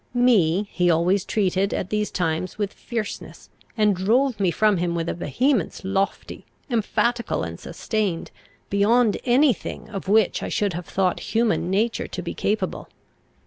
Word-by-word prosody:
Me 205 -6 +3
he 180 -1 +2
always 175 +4 +2
treated, 195 -1 0
at 185 - -4
these 210 0 0
times, 175 +1 -2
with 205 -2 -2
fierceness, 225 -4 -6 0.3
and 210 -2 +3
drove 235 +7 +1
me 190 -3 +2
from 210 +4 +2
him 170 0 -1
with 165 -1 -2
a - - -1
vehemence 205 - 0
lofty, 195 0 -2 0.3
emphatical, 235 +1 0
and - - -6
sustained, 205 -7 -3 0.4
beyond 215 +3 +3
any 260 +2 +5
thing 220 - -8
of 195 -2 -6
which 210 0 +3
I - - -4
should 205 -3 0
have 175 +1 -6
thought 185 -2 0 0.2
human 225 -6 +2
nature 220 +5 0
to 185 - -5
be 170 - -4
capable. 210 +2 -2
200 Hz, 155 wpm, -23 LUFS, 180-225 Hz, 0.4 s, any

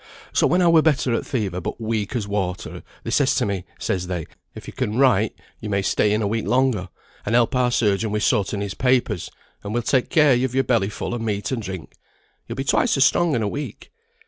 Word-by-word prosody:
So - - +3
when 180 +1 +3
I - - +4
were 165 -1 +6
better 140 -5 +2
o' - - +1
th' - - -14
fever, 100 -8 -2
but - - -5
weak 110 0 -2
as 110 -4 -2
water, 95 -3 -3 0.2
they - - -4
says - - +3
to - - +1
me, 100 -3 -3
says 90 -2 -2
they, 90 -4 -3 0.3
'If - - -10
yo - - -8
can 105 +2 -2
write, 110 -6 +3 0.2
yo 110 - -6
may 100 -1 0
stay 105 +1 +2
in 105 +1 +1
a - - +1
week 110 +1 -2
longer, 125 -7 +1 0.3
and 110 - 0
help 120 +2 +3
our 125 -1 +3
surgeon 110 -2 +1
wi' 105 - -1
sorting 100 -1 +1
his 100 -1 -3
papers; 125 -7 0 0.3
and 105 +2 -4
we'll 120 - 0
take 130 +1 +1
care 150 -4 +5
yo've 125 +1 0
your 135 - +3
belly 115 -7 +1
full 105 - -5
o' 120 - -3
meat 105 -1 -2
and 125 -3 -2
drink. 95 -5 -7 0.5
Yo'll - - -5
be 135 - -2
twice 140 - +2
as 135 - +5
strong 165 +3 +2
in 115 - 0
a - - 0
week.' 145 +8 -6
110 Hz, 240 wpm, -22 LUFS, 100-130 Hz, 0.5 s, were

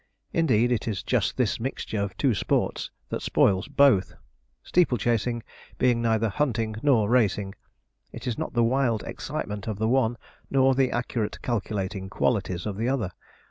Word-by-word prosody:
Indeed, 120 -8 +3
it 120 -2 0
is 105 -6 -2
just - - 0
this - - +1
mixture 115 -3 -3
of 100 -1 -4
two 135 -4 +2
sports 100 - -1 0.2
that - - -3
spoils 95 -2 +2
both; 140 -9 +3 0.5
steeple 170 -8 +2
chasing 120 +1 0 0.3
being 120 -2 +2
neither 115 -1 +2
hunting 115 -2 -1
nor 125 -8 +3
racing. 105 -4 +1 0.6
It - - -9
has 125 -3 -1
not - - -4
the 120 -1 +3
wild 120 -2 +1
excitement 105 0 -5
of 110 -3 -2
the 110 +1 0
one, 120 -1 +2 0.3
nor 135 -1 +4
the 130 -1 +2
accurate 120 -3 -2
calculating 100 -4 -2
qualities 95 -5 0
of 105 -2 -3
the 115 +3 0
other. 115 -9 -1
115 Hz, 160 wpm, -26 LUFS, 105-125 Hz, 0.6 s, nor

